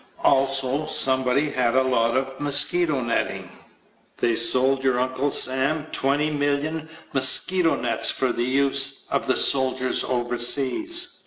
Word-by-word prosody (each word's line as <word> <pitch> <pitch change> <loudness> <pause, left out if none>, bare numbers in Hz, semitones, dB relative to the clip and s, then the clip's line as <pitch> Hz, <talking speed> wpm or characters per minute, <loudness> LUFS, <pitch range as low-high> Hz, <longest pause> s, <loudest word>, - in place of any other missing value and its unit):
Also 135 +2 0
somebody 130 +1 +1
had 125 -1 -2
a 130 - +2
lot 115 -2 -1
of 135 0 -5
mosquito 145 +1 +1
netting. 120 -1 -4 0.7
They 115 - -1
sold 130 +3 +1
your 130 -2 0
Uncle 130 +2 -3
Sam 140 +4 +2
20,000,000 145 +2 -2 0.2
mosquito 165 +6 +3
nets - - 0
for 130 -2 -2
the - - -5
use 135 +1 +1
of - - -3
the - - 0
soldiers 130 -1 +1
overseas. 130 - 0
135 Hz, 125 wpm, -21 LUFS, 130-145 Hz, 0.7 s, mosquito